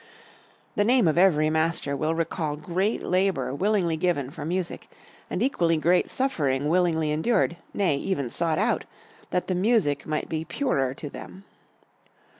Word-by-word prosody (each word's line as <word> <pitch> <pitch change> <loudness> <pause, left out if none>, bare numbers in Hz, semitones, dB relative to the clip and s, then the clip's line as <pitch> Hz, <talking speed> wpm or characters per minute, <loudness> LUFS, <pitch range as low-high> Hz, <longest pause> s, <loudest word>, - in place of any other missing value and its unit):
The 205 - +3
name 240 -2 +4
of 155 - +2
every 160 -4 +4
master 160 -3 0
will 155 +3 -1
recall 160 -2 -2
great 185 +8 -1
labor 180 -9 0
willingly 185 -1 +1
given 155 -6 0
for 145 - -7
music 175 +3 -3 0.4
and 195 - -1
equally 170 -11 +2
great 175 +4 +2
suffering 145 - 0
willingly 165 -3 +2
endured, 170 +2 +1
nay, 175 -8 +1
even 140 -7 -2
sought 165 +1 0
out, 215 +4 +1 0.4
that 180 - -1
the 185 - -1
music 185 - +1
might 155 -1 -2
be 160 -1 -3
purer 140 - -1
to 150 - -7
them. 190 +6 -10
165 Hz, 150 wpm, -26 LUFS, 150-190 Hz, 0.4 s, name